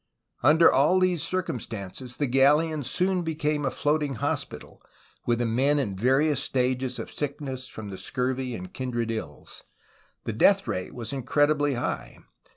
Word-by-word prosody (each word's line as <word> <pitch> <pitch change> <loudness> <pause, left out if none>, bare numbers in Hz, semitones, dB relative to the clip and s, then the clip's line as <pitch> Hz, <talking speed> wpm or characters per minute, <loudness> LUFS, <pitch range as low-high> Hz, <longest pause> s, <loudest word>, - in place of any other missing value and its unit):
Under 155 +5 +6
all 150 +7 +4
these 180 -3 +2
circumstances 125 - -4
the 145 - +1
galleon 145 +4 +3
soon 180 +7 +1
became 150 -2 -1
a 135 - +1
floating 150 0 0
hospital, - - -4 0.5
with 120 -1 +2
the 120 - 0
men 130 +6 +2
in 110 -9 -1
various 135 +7 +2
stages 130 -1 0
of - - -6
sick 145 -1 -4
ness 130 -3 -5
from 110 -4 -8
the 95 - -7
scurvy 125 +3 -2
and 185 0 -8
kindred 120 -3 -2
ills. 75 -11 -7 0.6
The 115 - -3
death 195 - +4
rate 90 - -3
was 120 0 -5
incredibly 145 +2 +2
high. - - -4
135 Hz, 155 wpm, -26 LUFS, 120-150 Hz, 0.6 s, Under